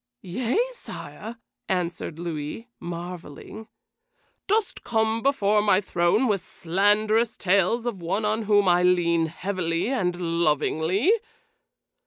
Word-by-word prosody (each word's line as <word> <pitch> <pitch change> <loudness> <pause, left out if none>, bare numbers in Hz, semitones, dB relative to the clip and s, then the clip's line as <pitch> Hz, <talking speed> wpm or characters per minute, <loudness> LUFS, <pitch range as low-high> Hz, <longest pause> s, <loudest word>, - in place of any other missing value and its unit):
"Yea, 235 - -1
sire," 235 - -8 0.3
answered 175 -4 -2
Louis, 165 +6 -5
marveling. 175 +4 -8 0.8
"Dost 425 0 0
come 220 -1 0
before 215 -6 +2
my 200 -3 +4
throne 190 +5 +1
with 200 -4 +1
slanderous 210 +6 +1
tales 200 +5 +2
of 220 -7 -3
one 195 +6 -1
on 215 +1 0
whom 205 -1 +4
I 175 0 +4
lean 170 -2 +3
heavily 180 +2 -2
and 180 -9 -1
lovingly?" 170 - +1
190 Hz, 110 wpm, -25 LUFS, 170-220 Hz, 0.8 s, my